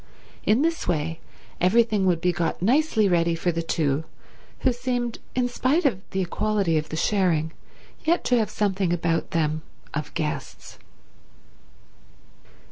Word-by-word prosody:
In 225 Hz, +7 st, +4 dB
this 330 Hz, 0 st, 0 dB
way 165 Hz, -1 st, -1 dB, 0.4 s
everything 210 Hz, +1 st, +3 dB
would 170 Hz, -3 st, +2 dB
be 180 Hz, -, +3 dB
got 175 Hz, -2 st, -1 dB
nicely 230 Hz, -, +3 dB
ready 170 Hz, -2 st, +2 dB
for 175 Hz, +2 st, 0 dB
the 165 Hz, 0 st, -2 dB
two 155 Hz, -3 st, 0 dB, 0.6 s
who 255 Hz, -, +3 dB
seemed, 245 Hz, -1 st, -2 dB, 0.2 s
in 250 Hz, -1 st, +2 dB
spite 265 Hz, +7 st, +1 dB
of 220 Hz, -9 st, +2 dB
the 190 Hz, -, -1 dB
equality 195 Hz, -1 st, 0 dB
of 155 Hz, -, -6 dB
the -, -, -4 dB
sharing, 165 Hz, -3 st, +1 dB, 0.5 s
yet 335 Hz, +2 st, +2 dB
to 250 Hz, -, +3 dB
have 215 Hz, -2 st, 0 dB
something 195 Hz, -4 st, 0 dB
about 170 Hz, -1 st, 0 dB
them 155 Hz, -1 st, 0 dB, 0.3 s
of 150 Hz, 0 st, -3 dB
guests. 150 Hz, -1 st, -4 dB
185 Hz, 140 wpm, -25 LUFS, 165-235 Hz, 0.6 s, In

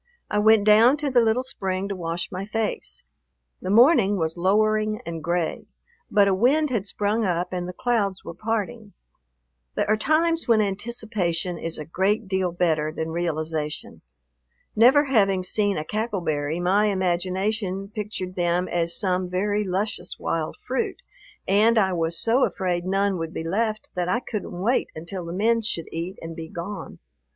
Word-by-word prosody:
I 210 Hz, -, +2 dB
went 215 Hz, 0 st, +5 dB
down 225 Hz, +6 st, +6 dB
to 290 Hz, -2 st, -2 dB
the 250 Hz, -, +5 dB
little 230 Hz, +2 st, +2 dB
spring 190 Hz, -6 st, -3 dB
to 200 Hz, -, -3 dB
wash 170 Hz, -1 st, -4 dB
my 190 Hz, +2 st, -5 dB
face. 225 Hz, -, -3 dB, 0.6 s
The 185 Hz, -, -4 dB
morning 215 Hz, -, +5 dB
was 160 Hz, -2 st, -1 dB
lowering 215 Hz, +4 st, +2 dB
and 165 Hz, -2 st, -5 dB
gray, 170 Hz, 0 st, -1 dB, 0.4 s
but 205 Hz, -1 st, +4 dB
a 195 Hz, -, +3 dB
wind 270 Hz, +9 st, +2 dB
had 210 Hz, -5 st, -1 dB
sprung 210 Hz, +3 st, 0 dB
up 180 Hz, -2 st, -1 dB
and 180 Hz, -1 st, -3 dB
the -, -, -4 dB
clouds 205 Hz, -4 st, -1 dB
were -, -, -6 dB
parting. 215 Hz, +2 st, -3 dB, 0.8 s
There -, -, 0 dB
are 215 Hz, -, +4 dB
times 320 Hz, +8 st, +1 dB
when 230 Hz, -2 st, +4 dB
anticipation 200 Hz, -5 st, -2 dB
is 165 Hz, 0 st, -3 dB
a 150 Hz, -, -6 dB
great 195 Hz, +6 st, 0 dB
deal 190 Hz, -2 st, 0 dB
better 160 Hz, -3 st, 0 dB
than 160 Hz, 0 st, -4 dB
realization. 155 Hz, -2 st, -3 dB, 0.7 s
Never 255 Hz, +7 st, +6 dB
having 200 Hz, -9 st, +2 dB
seen 205 Hz, +2 st, +1 dB
a 155 Hz, -, -3 dB
cackle 215 Hz, 0 st, -2 dB
berry, 155 Hz, 0 st, -1 dB
my 190 Hz, +4 st, +3 dB
imagination 190 Hz, +1 st, -1 dB
pictured 210 Hz, -4 st, -5 dB
them 175 Hz, +1 st, +1 dB
as 170 Hz, -1 st, +1 dB
some 185 Hz, -2 st, 0 dB
very 205 Hz, +3 st, 0 dB
luscious 190 Hz, -1 st, -3 dB
wild 160 Hz, -1 st, -3 dB
fruit, 260 Hz, +1 st, -2 dB, 0.5 s
and 215 Hz, +4 st, +4 dB
I 190 Hz, -3 st, +3 dB
was 165 Hz, -1 st, 0 dB
so 235 Hz, +4 st, +2 dB
afraid 180 Hz, -2 st, -1 dB
none 195 Hz, 0 st, +1 dB
would 165 Hz, 0 st, -5 dB
be -, -, -3 dB
left 215 Hz, +5 st, -1 dB
that 180 Hz, -1 st, -2 dB
I 235 Hz, -, +2 dB
couldn't 200 Hz, -7 st, -5 dB
wait 235 Hz, +6 st, +1 dB
until 170 Hz, +3 st, -6 dB
the 170 Hz, -, -6 dB
men 225 Hz, +5 st, +2 dB
should 205 Hz, -7 st, -2 dB
eat 170 Hz, +4 st, -5 dB
and 165 Hz, 0 st, -6 dB
be 165 Hz, -1 st, -7 dB
gone. 185 Hz, +5 st, -7 dB
195 Hz, 170 wpm, -24 LUFS, 175-215 Hz, 0.8 s, down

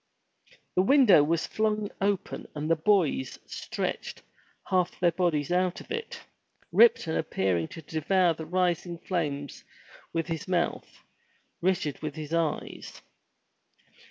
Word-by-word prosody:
The 180 Hz, -, +5 dB
window 210 Hz, -, +6 dB
was 165 Hz, +2 st, 0 dB
flung 215 Hz, -1 st, -1 dB
open 200 Hz, -1 st, -1 dB
and 150 Hz, +1 st, -3 dB
the -, -, +5 dB
boys 160 Hz, -6 st, +1 dB
stretched -, -, -4 dB, 0.4 s
half 180 Hz, -2 st, 0 dB
their 175 Hz, -1 st, +4 dB
bodies 165 Hz, -4 st, 0 dB
out 180 Hz, 0 st, +1 dB
of -, -, -13 dB
it, 455 Hz, 0 st, -4 dB, 0.5 s
Ripton 460 Hz, -, +5 dB
appearing 95 Hz, -, 0 dB
to 165 Hz, -, -10 dB
devour 170 Hz, +4 st, +2 dB
the 160 Hz, 0 st, -8 dB
rising 175 Hz, -1 st, 0 dB
flames 150 Hz, -6 st, -3 dB, 0.5 s
with 165 Hz, -1 st, -1 dB
his 165 Hz, 0 st, -4 dB
mouth, 175 Hz, -2 st, -2 dB, 0.6 s
Richard 175 Hz, -6 st, 0 dB
with 155 Hz, -1 st, -4 dB
his 155 Hz, 0 st, -6 dB
eyes. 165 Hz, -2 st, -3 dB
170 Hz, 125 wpm, -28 LUFS, 155-185 Hz, 0.6 s, window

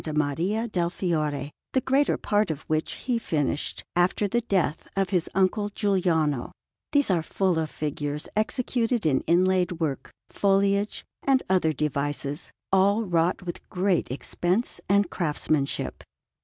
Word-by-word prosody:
Maria 170 Hz, +10 st, 0 dB
del 175 Hz, -5 st, 0 dB
Fiore, 150 Hz, -6 st, -1 dB, 0.2 s
the 260 Hz, -, +3 dB
greater 270 Hz, +3 st, +2 dB
part 210 Hz, -1 st, +1 dB
of 155 Hz, -3 st, -3 dB
which 155 Hz, 0 st, -1 dB
he 245 Hz, -3 st, -2 dB
finished 150 Hz, -, -1 dB
after 180 Hz, +4 st, +2 dB
the 240 Hz, +5 st, +1 dB
death 190 Hz, -9 st, 0 dB
of 195 Hz, -1 st, 0 dB
his 180 Hz, -3 st, +1 dB
uncle 195 Hz, +2 st, +2 dB
Giuliano; 175 Hz, -, +1 dB, 0.4 s
these 285 Hz, -7 st, +3 dB
are 175 Hz, -3 st, +2 dB
full 180 Hz, +1 st, 0 dB
of 160 Hz, -1 st, -1 dB
figures 150 Hz, 0 st, -3 dB
executed 235 Hz, 0 st, 0 dB
in 135 Hz, -4 st, +3 dB
inlaid 185 Hz, +1 st, +3 dB
work, 160 Hz, -5 st, -3 dB, 0.2 s
foliage, 200 Hz, +1 st, +1 dB, 0.2 s
and 270 Hz, -1 st, +3 dB
other 180 Hz, -4 st, +3 dB
devices, 145 Hz, 0 st, -2 dB, 0.2 s
all 200 Hz, +3 st, +4 dB
wrought 175 Hz, -2 st, +1 dB
with 175 Hz, -1 st, -7 dB
great 185 Hz, -1 st, +1 dB
expense 175 Hz, -, -1 dB
and 200 Hz, -2 st, +3 dB
craftsmanship. 150 Hz, -4 st, -1 dB
180 Hz, 135 wpm, -26 LUFS, 155-205 Hz, 0.4 s, all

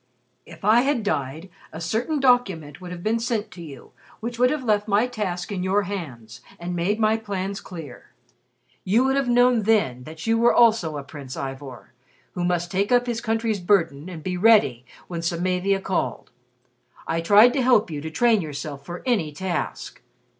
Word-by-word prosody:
If 170 Hz, +2 st, -11 dB
I 220 Hz, +3 st, +6 dB
had 270 Hz, -3 st, 0 dB
died, 160 Hz, -1 st, -3 dB, 0.2 s
a 160 Hz, -, -8 dB
certain 225 Hz, -, -1 dB
document 195 Hz, -, +1 dB
would 180 Hz, -, -8 dB
have 175 Hz, -1 st, -8 dB
been 225 Hz, +2 st, +1 dB
sent 230 Hz, -3 st, -2 dB
to 175 Hz, -, -11 dB
you 140 Hz, -6 st, -11 dB, 0.3 s
which 235 Hz, +1 st, -5 dB
would 250 Hz, 0 st, +5 dB
have 300 Hz, -2 st, -2 dB
left 210 Hz, -3 st, +1 dB
my 210 Hz, +3 st, +3 dB
task 205 Hz, -7 st, -4 dB
in 190 Hz, -3 st, -3 dB
your 195 Hz, +3 st, +1 dB
hands 135 Hz, -, -7 dB, 0.2 s
and 175 Hz, +1 st, -4 dB
made 190 Hz, +6 st, 0 dB
my 215 Hz, 0 st, +3 dB
plans 200 Hz, -2 st, -4 dB
clear. 160 Hz, -9 st, -10 dB, 0.7 s
You 220 Hz, +7 st, +3 dB
would 265 Hz, 0 st, +1 dB
have 275 Hz, -3 st, 0 dB
known 245 Hz, -1 st, +4 dB
then 195 Hz, -, +1 dB
that 160 Hz, +1 st, -9 dB
you 230 Hz, +1 st, +3 dB
also 225 Hz, -8 st, +4 dB
were 145 Hz, -, -4 dB
a -, -, -13 dB
Prince 140 Hz, -2 st, -9 dB
Ivor, 135 Hz, -2 st, -7 dB, 0.4 s
who 180 Hz, -, -4 dB
must 175 Hz, -1 st, -1 dB
take 200 Hz, +3 st, 0 dB
up 245 Hz, 0 st, +4 dB
his 235 Hz, -2 st, -3 dB
country's 225 Hz, -2 st, -1 dB
burden 170 Hz, -5 st, +1 dB
and 165 Hz, -4 st, -8 dB
be 180 Hz, -1 st, -2 dB
ready 180 Hz, -, +4 dB, 0.2 s
when 170 Hz, -2 st, -5 dB
Samavia 180 Hz, +3 st, 0 dB
called. 180 Hz, -13 st, -3 dB, 0.7 s
I 165 Hz, 0 st, -1 dB
tried 210 Hz, +8 st, +6 dB
to 270 Hz, -, +1 dB
help 240 Hz, -8 st, +3 dB
you 145 Hz, -2 st, -4 dB
to 160 Hz, -, -5 dB
train 225 Hz, +5 st, +3 dB
yourself 145 Hz, -2 st, -6 dB
for 175 Hz, +4 st, -8 dB
any 210 Hz, -12 st, 0 dB
task. 180 Hz, +4 st, -4 dB
190 Hz, 185 wpm, -23 LUFS, 160-225 Hz, 0.7 s, I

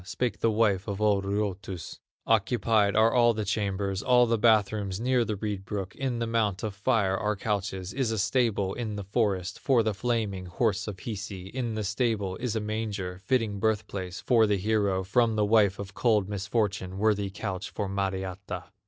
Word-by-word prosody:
Spake 115 Hz, +4 st, -2 dB
the 115 Hz, -, +2 dB
wife 105 Hz, -3 st, +2 dB
of 100 Hz, -1 st, -3 dB
old 105 Hz, -2 st, +2 dB
Ruotus: 100 Hz, -4 st, -3 dB, 0.3 s
'Occupied 110 Hz, -2 st, +2 dB
are 110 Hz, +1 st, +4 dB
all 120 Hz, -2 st, +4 dB
the 110 Hz, -1 st, -2 dB
chambers, 100 Hz, -1 st, -1 dB
All 125 Hz, 0 st, +5 dB
the 115 Hz, -1 st, +1 dB
bath 110 Hz, -3 st, +4 dB
rooms 100 Hz, -3 st, -3 dB
near 125 Hz, +1 st, +2 dB
the 110 Hz, -2 st, -2 dB
reed 100 Hz, -1 st, -4 dB
brook; 95 Hz, -1 st, -5 dB
In 130 Hz, -3 st, -2 dB
the 115 Hz, -, -1 dB
mount 110 Hz, -5 st, 0 dB
of 110 Hz, -2 st, -2 dB
fire 100 Hz, -1 st, +1 dB
are 105 Hz, +1 st, -1 dB
couches, 100 Hz, -3 st, -3 dB
Is 130 Hz, -4 st, 0 dB
a 110 Hz, -, -1 dB
stable 100 Hz, -1 st, +1 dB
in 110 Hz, -4 st, -4 dB
the 100 Hz, -, -4 dB
forest, 100 Hz, -3 st, -1 dB
For 125 Hz, -5 st, +3 dB
the 110 Hz, -1 st, 0 dB
flaming 105 Hz, -4 st, -2 dB
horse 105 Hz, +3 st, 0 dB
of 100 Hz, -3 st, -6 dB
Hisi; 100 Hz, -4 st, -6 dB
In 120 Hz, -1 st, -3 dB
the 110 Hz, -, -2 dB
stable 105 Hz, -2 st, -1 dB
is 120 Hz, -2 st, -2 dB
a -, -, +1 dB
manger, 105 Hz, -4 st, -3 dB
Fitting 115 Hz, -6 st, +1 dB
birth 110 Hz, 0 st, +1 dB
place 95 Hz, -2 st, -6 dB
for 115 Hz, -3 st, +4 dB
the 105 Hz, -1 st, +2 dB
hero 100 Hz, -2 st, +1 dB
From 115 Hz, +3 st, +2 dB
the 105 Hz, -1 st, +2 dB
wife 105 Hz, -2 st, +4 dB
of 95 Hz, -1 st, -7 dB
cold 105 Hz, -4 st, +2 dB
misfortune, 100 Hz, -2 st, -2 dB
Worthy 105 Hz, -1 st, +1 dB
couch 95 Hz, -1 st, -5 dB
for 105 Hz, -, -3 dB
Mariatta. 95 Hz, 0 st, -3 dB
105 Hz, 190 wpm, -28 LUFS, 95-115 Hz, 0.3 s, All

